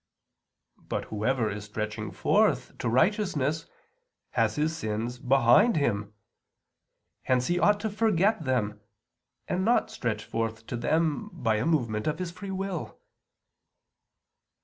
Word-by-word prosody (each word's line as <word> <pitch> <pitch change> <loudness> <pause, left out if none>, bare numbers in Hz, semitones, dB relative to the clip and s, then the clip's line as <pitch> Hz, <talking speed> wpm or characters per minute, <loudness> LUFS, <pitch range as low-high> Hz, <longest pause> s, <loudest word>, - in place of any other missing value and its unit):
But - - -4
whoever 115 +2 +1
is 105 0 -6
stretching 105 0 -4
forth - - +1
to - - -1
righteousness 160 - +1 0.6
has - - +1
his 155 +2 0
sins 115 -1 -3
behind 130 - +5
him. 105 -8 -1 1.1
Hence 125 -1 +1
he 175 +3 +1
ought 205 +2 +4
to 220 - -1
forget 210 -2 +2
them, 105 -6 -1 0.7
and 185 - 0
not 235 +4 +2
stretch 110 -3 -3
forth 115 0 -3
to 120 - -5
them 160 - 0
by 120 - 0
a 110 - 0
movement 115 -9 0
of 155 - 0
his 180 -2 -4
free 185 +3 -8
will. 190 -2 -4
135 Hz, 125 wpm, -28 LUFS, 115-180 Hz, 1.1 s, behind